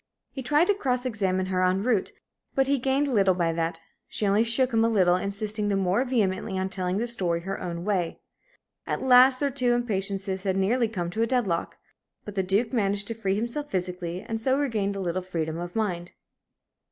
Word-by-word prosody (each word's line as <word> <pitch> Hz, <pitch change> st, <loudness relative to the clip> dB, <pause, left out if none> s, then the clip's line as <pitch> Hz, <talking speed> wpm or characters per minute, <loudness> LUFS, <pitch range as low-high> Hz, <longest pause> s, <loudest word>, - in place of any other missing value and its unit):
He 270 Hz, -, -6 dB
tried 295 Hz, +6 st, +3 dB
to 410 Hz, -, +3 dB
cross 255 Hz, -9 st, -1 dB
examine 190 Hz, -6 st, 0 dB
her 185 Hz, -1 st, -1 dB
en 185 Hz, +2 st, +2 dB
route, 225 Hz, -5 st, +1 dB, 0.4 s
but 270 Hz, -, +3 dB
he 275 Hz, 0 st, +1 dB
gained 270 Hz, +3 st, +1 dB
little 195 Hz, -8 st, +3 dB
by 170 Hz, -2 st, 0 dB
that; 165 Hz, 0 st, -2 dB, 0.3 s
she 210 Hz, -, -3 dB
only 205 Hz, +2 st, +3 dB
shook 245 Hz, +2 st, +1 dB
him 225 Hz, 0 st, +3 dB
a 230 Hz, -, +3 dB
little, 185 Hz, -5 st, +4 dB
insisting 205 Hz, +3 st, -3 dB
the 200 Hz, -, +1 dB
more 195 Hz, +5 st, +2 dB
vehemently 200 Hz, -5 st, 0 dB
on 190 Hz, 0 st, -1 dB
telling 185 Hz, -1 st, -2 dB
the 230 Hz, -, 0 dB
story 180 Hz, -8 st, 0 dB
her 195 Hz, +2 st, -5 dB
own 170 Hz, 0 st, -4 dB
way. 185 Hz, -5 st, -1 dB, 0.7 s
At -, -, -2 dB
last 255 Hz, 0 st, +6 dB
their 285 Hz, -1 st, 0 dB
two 245 Hz, -2 st, +1 dB
impatiences 195 Hz, -4 st, -2 dB
had 190 Hz, -1 st, -1 dB
nearly 230 Hz, +5 st, +2 dB
come 175 Hz, -6 st, -4 dB
to 220 Hz, +4 st, -2 dB
a 230 Hz, -, +2 dB
dead 250 Hz, -1 st, +1 dB
lock. 170 Hz, -3 st, -2 dB, 0.5 s
But 210 Hz, -, -7 dB
the 190 Hz, -, 0 dB
Duke 200 Hz, +6 st, 0 dB
managed 205 Hz, -2 st, 0 dB
to -, -, -1 dB
free 200 Hz, -4 st, -1 dB
himself 240 Hz, +7 st, -3 dB
physically, 180 Hz, -1 st, -3 dB
and 225 Hz, 0 st, -3 dB
so 260 Hz, +3 st, +2 dB
regained 215 Hz, -8 st, -1 dB
a -, -, -4 dB
little 185 Hz, -1 st, -2 dB
freedom 165 Hz, -3 st, -3 dB
of 175 Hz, 0 st, -6 dB
mind. 180 Hz, -6 st, -2 dB
200 Hz, 210 wpm, -26 LUFS, 185-240 Hz, 0.7 s, last